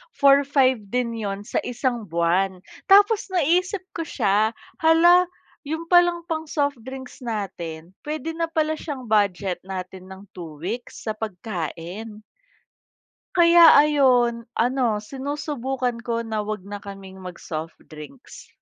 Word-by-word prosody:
4,500 275 -2 +4
din 245 0 -1
yun 200 -2 -4
sa - - -1
isang 245 -2 -2
buwan. 180 +3 +1 0.3
Tapos 410 +2 +5
naisip 360 +3 +1
ko 330 - -2
siya, 215 -2 +1 0.3
"Hala, 345 +3 +6 0.4
yun 320 +2 -3
palang 350 -1 +4
pang 320 -1 -2
soft 285 -2 0
drinks 260 +1 -9
natin 175 -7 -5 0.2
pwede 310 +2 -3
na 335 - +1
pala 315 -1 0
siyang 275 -5 -6
budget 200 -4 +1
natin 185 0 -7
ng 190 +1 -11
2 165 -4 -9
weeks 225 +8 -6
sa 220 - -1
pagkain." 205 +1 -6 1.1
kaya 340 -1 +8
ayun. 255 -6 +3
Ano, 235 -3 +1
sinusubukan 265 -2 -3
ko 235 -1 -2
na 220 -1 -3
wag 215 -3 -4
na 205 +1 -7
kaming 195 -1 -10
mag-soft 165 -3 -7
drinks. 155 - -12
235 Hz, 125 wpm, -23 LUFS, 195-295 Hz, 1.1 s, kaya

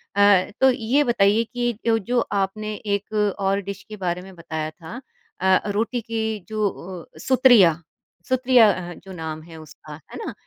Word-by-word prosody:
अ, 200 -2 +5
तो 265 - +7
ये 250 +4 +1
बताइए 225 -2 +3
कि 240 0 0
जो 225 -1 +3
जो 240 +5 0 0.2
आपने 215 +2 -3
एक 205 0 -3 0.3
और 195 +1 +1
डिश 200 +1 -7
के 215 - -7
बारे 175 +1 -1
में 190 0 -13
बताया 160 -2 -5
था 180 +11 -10 0.4
अ, 190 0 +5
रोटी 230 +4 -1
की 220 -1 -3
जो 215 -1 0
अ, 180 -2 -10
सुत्रिया 240 -11 +5 0.5
सुत्रिया 255 -3 +5
अ, 175 -1 -5
जो 190 +2 -13
नाम 160 -2 -6
है 165 -1 -12
उसका, 155 0 -12
है - - -9
ना? - - -5
200 Hz, 170 wpm, -23 LUFS, 180-230 Hz, 0.5 s, तो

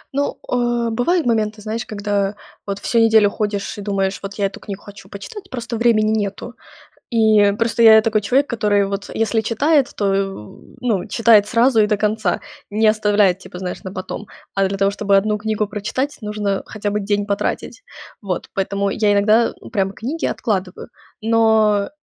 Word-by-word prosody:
Ну, 285 0 -1
э, 240 -1 0
бывают 320 +9 +1
моменты, 215 -2 0
знаешь, 220 +2 -4
когда 205 -1 -1 0.3
вот 200 0 -2
всю 230 +3 0
неделю 220 -2 +5
ходишь 205 -1 -3
и - - -5
думаешь, 195 -1 -1
вот 195 0 -7
я 205 - 0
эту 195 - -4
книгу 200 -2 -8
хочу 200 -1 -13
почитать. 390 - -9
Просто 240 -2 -5
времени 220 -2 +3
нету. 200 +4 -6 0.6
И 215 -3 +4
просто 230 0 +1
я 220 -1 +8
такой 215 -1 +1
человек, 265 +7 +2
который, 205 -4 +1
вот, 200 0 -4
если 225 0 +1
читает, 275 +6 +2
то, 205 - 0
в, 195 - -4
ну, 220 -6 -1
читает 220 -1 +4
сразу 235 +1 +3
и 210 - +4
до 210 0 +1
конца, 215 +2 0 0.3
не 215 +1 +3
оставляет 210 -3 +3
типа, 180 -1 -10
знаешь, 180 0 -5
на 185 - -6
потом. 190 +2 -6 0.3
А 195 0 +2
для 195 +1 -2
того, 195 0 +2
чтобы 200 -1 +1
одну 210 +2 +1
книгу 215 -1 -2
прочитать, 245 +8 -3
нужно 210 -2 -2
хотя 210 -1 -4
бы 210 - -1
день 205 0 -1
потратить. 200 - -3 0.4
Вот, 190 -4 -4
поэтому 200 +1 -1
я 210 -1 +2
иногда 215 +3 +3 0.2
прям 195 -1 0
книги 270 +11 -4
откладываю. 190 -3 -3 0.3
Но 220 -2 +3
210 Hz, 175 wpm, -19 LUFS, 200-225 Hz, 0.6 s, я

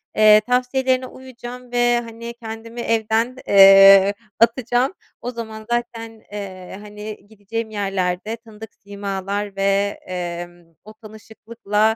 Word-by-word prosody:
Eee, 215 0 +6
tavsiyelerine 255 +1 +1
uyacağım 250 -1 -11
ve, 240 0 +2
hani, 230 0 -8
kendimi 230 0 -8
evden, 225 +2 0
eee, 195 0 +8 0.3
atacağım. 245 +4 +2 0.3
O 245 - -4
zaman 220 -2 -8
zaten, 230 -2 -4
eee, 190 -3 -8
hani, 210 0 -9
gideceğim 220 +1 -6
yerlerde 195 0 -2
tanıdık 220 -2 -13
simalar 200 0 -5
ve, 200 +1 0
emm, 175 -2 -7
o 215 - -13
tanışıklıkla, 220 0 -3
220 Hz, 110 wpm, -20 LUFS, 200-235 Hz, 0.3 s, eee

